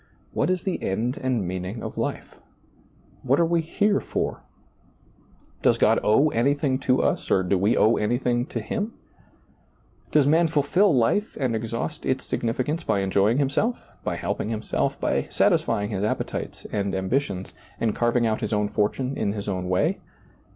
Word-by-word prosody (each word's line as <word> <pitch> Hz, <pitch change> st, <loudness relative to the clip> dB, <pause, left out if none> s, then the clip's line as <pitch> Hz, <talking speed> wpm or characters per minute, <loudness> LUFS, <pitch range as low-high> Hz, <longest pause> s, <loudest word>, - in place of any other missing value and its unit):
What 150 Hz, -, +1 dB
is 185 Hz, -1 st, 0 dB
the 190 Hz, -, -2 dB
end 115 Hz, +7 st, -1 dB
and 125 Hz, -8 st, 0 dB
meaning 95 Hz, +4 st, -4 dB
of -, -, -6 dB
life? -, -, -3 dB, 0.9 s
What 135 Hz, +4 st, +2 dB
are 170 Hz, -, +4 dB
we 170 Hz, 0 st, +2 dB
here 200 Hz, +5 st, +1 dB
for? -, -, -3 dB, 1.2 s
Does -, -, +3 dB
God -, -, +4 dB
owe 135 Hz, +9 st, +4 dB
anything 140 Hz, +2 st, +1 dB
to 130 Hz, -1 st, +2 dB
us, -, -, 0 dB
or 95 Hz, -, +3 dB
do 90 Hz, +2 st, +1 dB
we 100 Hz, +4 st, +2 dB
owe 110 Hz, +2 st, +4 dB
anything 120 Hz, +3 st, 0 dB
to -, -, -4 dB
Him? 220 Hz, +1 st, -3 dB, 1.2 s
does 150 Hz, -2 st, +4 dB
man 165 Hz, +4 st, +4 dB
fulfill 165 Hz, +6 st, +3 dB
life 140 Hz, -, +1 dB
and 125 Hz, -4 st, 0 dB
exhaust 115 Hz, +7 st, -4 dB
its 130 Hz, 0 st, -1 dB
sig -, -, -3 dB
nificance 130 Hz, +7 st, -1 dB
by 100 Hz, -, +1 dB
enjoying 100 Hz, +4 st, +2 dB
himself, 145 Hz, -, +1 dB, 0.3 s
by -, -, -2 dB
helping 105 Hz, -, -3 dB
himself, 110 Hz, -1 st, -1 dB
by -, -, 0 dB
satisfying 105 Hz, +1 st, +1 dB
his 100 Hz, -1 st, -2 dB
appetites 105 Hz, -, -3 dB
and 100 Hz, -2 st, -1 dB
ambitions, 95 Hz, -1 st, -2 dB, 0.3 s
and 110 Hz, -2 st, +1 dB
carving 120 Hz, 0 st, +1 dB
out 110 Hz, -1 st, 0 dB
his -, -, -2 dB
own 105 Hz, 0 st, +1 dB
fortune 125 Hz, +7 st, -1 dB
in 100 Hz, -, -1 dB
his 100 Hz, -2 st, -5 dB
own 90 Hz, -2 st, -2 dB
way 90 Hz, 0 st, +1 dB
120 Hz, 165 wpm, -25 LUFS, 105-145 Hz, 1.2 s, are